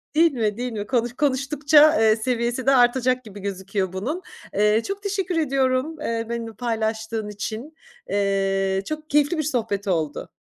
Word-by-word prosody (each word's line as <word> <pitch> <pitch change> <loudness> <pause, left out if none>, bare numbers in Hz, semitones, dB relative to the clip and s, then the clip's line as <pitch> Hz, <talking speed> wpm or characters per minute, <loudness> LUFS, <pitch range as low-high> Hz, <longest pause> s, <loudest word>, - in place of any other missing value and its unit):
değil 330 0 +5
mi, 215 -3 -1
değil 250 0 -3
mi? 205 -2 -5
Konuş 240 -2 0
konuştukça, 290 +2 +4
eee, 220 -1 +5
seviyesi 240 +2 -1
de 270 - +5
artacak 255 +1 +3
gibi 205 -2 -11
gözüküyor 190 -1 -3
bunun. 275 - -3 0.3
Eee, 210 +2 +3
çok 395 +1 -5
teşekkür 385 -3 -2
ediyorum, 270 0 +1
eee, 230 -4 -2
benimle 230 -1 -4
paylaştığın 220 -1 -2
için. 220 +9 -6 0.3
Eee, 195 -1 +1
çok 310 0 -6
keyifli 295 +3 +2
bir 310 - 0
sohbet 225 -8 -2
oldu. 160 -5 -2
235 Hz, 155 wpm, -23 LUFS, 210-280 Hz, 0.3 s, değil